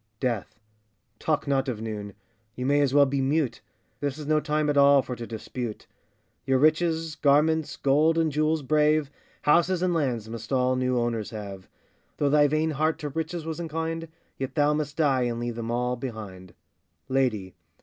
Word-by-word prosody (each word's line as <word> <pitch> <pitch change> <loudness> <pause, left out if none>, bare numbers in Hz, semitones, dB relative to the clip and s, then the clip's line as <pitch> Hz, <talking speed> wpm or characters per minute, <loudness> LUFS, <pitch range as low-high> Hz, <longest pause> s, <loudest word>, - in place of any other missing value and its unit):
DEATH. 120 -4 -2 0.6
Talk 155 -2 0
not 135 -1 +1
of 115 -4 -3
noon! 105 -3 -6 0.4
you 125 - -4
may 145 +2 +3
as 140 -2 +2
well 140 +1 +6
be 135 0 -1
mute; 140 0 0 0.4
This 140 -1 -2
is 150 - -7
no 155 +1 +3
time 150 0 0
at 145 - +1
all 140 -1 +6
for 125 - -5
to 120 -1 -7
dispute: 115 0 -6 0.6
Your 135 -1 +2
riches, 160 +2 +2
garments, 155 +1 +2
gold, 150 +4 +3
and 160 -2 +2
jewels 155 +1 +1
brave, 150 +1 +2 0.3
Houses 175 +4 +3
and 180 -1 +2
lands 125 -9 -1
must 115 +1 -8
all 130 -1 +2
new 125 0 0
owners 120 -3 -1
have; 100 -4 -8 0.5
Though 145 -1 +1
thy 145 0 +5
vain 155 +2 +1
heart 155 +2 0
to 150 - -5
riches 160 +2 -4
was 160 0 -4
inclined, 165 0 -3 0.3
Yet 135 -1 -4
thou 150 -1 +3
must 150 -1 -3
die 140 -5 +3
and 120 -1 -2
leave 120 0 -3
them 115 -1 -5
all 125 +1 0
behind. 105 -8 -8 0.5
LADY. 120 -9 0
140 Hz, 180 wpm, -26 LUFS, 120-155 Hz, 0.6 s, well